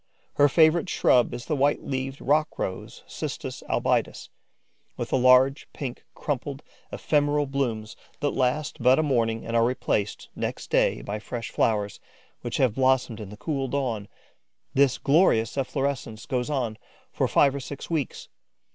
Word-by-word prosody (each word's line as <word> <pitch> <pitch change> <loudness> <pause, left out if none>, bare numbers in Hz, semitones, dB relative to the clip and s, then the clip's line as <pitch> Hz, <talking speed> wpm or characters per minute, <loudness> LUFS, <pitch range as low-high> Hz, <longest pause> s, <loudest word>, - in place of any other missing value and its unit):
Her 145 0 +5
favourite 165 +4 +4
shrub 125 -1 +3
is 120 - -6
the 155 - -1
white 140 +1 +2
leaved 135 0 -4
rock 150 +3 +1
rose 95 - -5
(Cistus - - -6
albidus), - - 0 0.7
with - - -4
the - - +3
large, 130 +2 +5
pink, 130 -4 -6
crumpled, 140 0 -4 0.3
ephemeral 145 -1 +1
blooms 120 -6 -2 0.2
that 145 0 0
last 135 +2 -1
but 125 +2 +5
a 155 - +2
morning 115 -6 0
and 115 - -3
are 115 - +4
replaced, 110 -4 -1
next - - -4
day, - - +2
by 105 +2 -4
fresh 115 +1 -6
flowers, 105 -3 0 0.4
which - - -3
have 130 -5 +3
blossomed 130 -2 +1
in 105 -3 -7
the 105 - -10
cool 135 0 -2
dawn. 120 -7 -2 0.7
This 140 -2 +3
glorious 140 - +3
efflorescence 135 -4 -2
goes 125 0 -2
on 120 -7 -2 0.3
for - - 0
five 140 -2 +4
or 140 - -3
six 140 +4 -8
weeks. 155 -6 -2
130 Hz, 155 wpm, -26 LUFS, 115-140 Hz, 0.7 s, Her